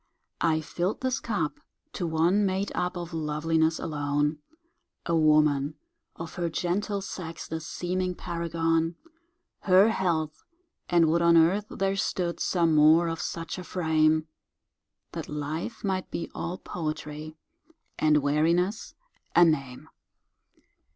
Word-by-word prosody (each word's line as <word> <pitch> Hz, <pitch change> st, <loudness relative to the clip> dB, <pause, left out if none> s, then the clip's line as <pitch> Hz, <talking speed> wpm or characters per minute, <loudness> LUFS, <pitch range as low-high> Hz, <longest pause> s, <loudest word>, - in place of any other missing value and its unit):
I 160 Hz, -1 st, +2 dB
fill'd 175 Hz, +5 st, -2 dB
this 260 Hz, 0 st, 0 dB
cup 200 Hz, -, -2 dB, 0.3 s
to 175 Hz, -, -2 dB
one 170 Hz, +6 st, +2 dB
made 195 Hz, +1 st, 0 dB
up 180 Hz, +1 st, -2 dB
Of 175 Hz, -1 st, -6 dB
loveliness 160 Hz, +1 st, +1 dB
alone, 145 Hz, 0 st, -1 dB, 0.7 s
A 170 Hz, -, +1 dB
woman, 150 Hz, -2 st, +3 dB, 0.4 s
of 165 Hz, -1 st, -7 dB
her 170 Hz, -1 st, -1 dB
gentle 195 Hz, +5 st, -1 dB
sex 175 Hz, -4 st, -7 dB
The 160 Hz, -, -4 dB
seeming 180 Hz, +2 st, -2 dB
paragon— 165 Hz, -1 st, -1 dB, 0.6 s
Her 190 Hz, +3 st, +5 dB
health! 160 Hz, -6 st, -1 dB, 0.5 s
and 170 Hz, -2 st, +4 dB
would 170 Hz, +2 st, +2 dB
on 170 Hz, 0 st, +5 dB
earth 190 Hz, +6 st, +3 dB
there 195 Hz, 0 st, -1 dB
stood, 180 Hz, -3 st, -1 dB
Some 170 Hz, -3 st, +2 dB
more 155 Hz, +3 st, +6 dB
of 165 Hz, 0 st, -3 dB
such 165 Hz, +2 st, -4 dB
a -, -, -6 dB
frame, 160 Hz, -3 st, +2 dB, 0.8 s
That -, -, -6 dB
life 155 Hz, +9 st, -4 dB
might 190 Hz, -2 st, -1 dB
be -, -, -5 dB
all 175 Hz, +2 st, -4 dB
poetry, 155 Hz, -2 st, -5 dB, 0.6 s
And 150 Hz, -2 st, +3 dB
weariness 170 Hz, +8 st, +1 dB, 0.4 s
a 175 Hz, -, +8 dB
name. 135 Hz, -6 st, -1 dB
165 Hz, 125 wpm, -27 LUFS, 155-180 Hz, 0.8 s, a